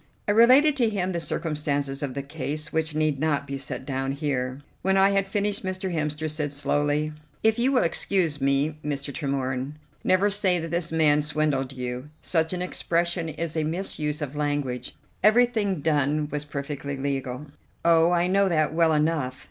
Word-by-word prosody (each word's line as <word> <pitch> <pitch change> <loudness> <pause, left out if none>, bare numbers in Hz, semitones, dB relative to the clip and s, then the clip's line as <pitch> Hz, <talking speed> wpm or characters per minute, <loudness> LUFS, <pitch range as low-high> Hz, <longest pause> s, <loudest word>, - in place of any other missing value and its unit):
I - - +3
related 255 +7 +6
to 235 -4 +3
him 190 -3 -1
the 170 - -2
circumstances 150 -3 -1
of 135 -3 -3
the 140 - -3
case, 150 +1 -4
which 160 -1 0
need 155 -3 +1
not 150 -2 0
be 140 - -5
set 135 -1 -5
down 135 0 -2
here. 135 -2 -2 0.2
When 190 +1 +2
I 195 +1 +5
had 195 0 +1
finished 205 +1 -1
Mr. 185 0 -3
Hemster 150 -1 -2
said 150 -1 -2
slowly: 145 +1 0 0.3
"If 220 +1 +3
you 255 +3 +3
will 255 - +3
excuse 165 -3 +1
me, 140 +3 +1
Mr. 140 -1 -3
Tremorne, 135 -2 -2 0.3
never 195 +2 +3
say 195 -3 +3
that 165 -1 -4
this 170 -1 +1
man 150 -2 +4
swindled 150 -3 0
you. 125 +2 -5
Such 160 -2 0
an 180 -1 -2
expression 170 -1 -1
is 160 +1 -4
a 160 - +1
misuse 155 -2 -2
of 145 0 -6
language. 145 -4 -2 0.3
Everything 215 -5 +3
done 150 0 +1
was 150 0 -3
perfectly 140 -1 -5
legal." 135 0 -3 0.4
"Oh, 165 0 +5
I 175 0 +2
know 195 +1 +3
that 155 -3 +1
well 165 -1 +3
enough. 150 -4 0
155 Hz, 175 wpm, -25 LUFS, 140-180 Hz, 0.4 s, related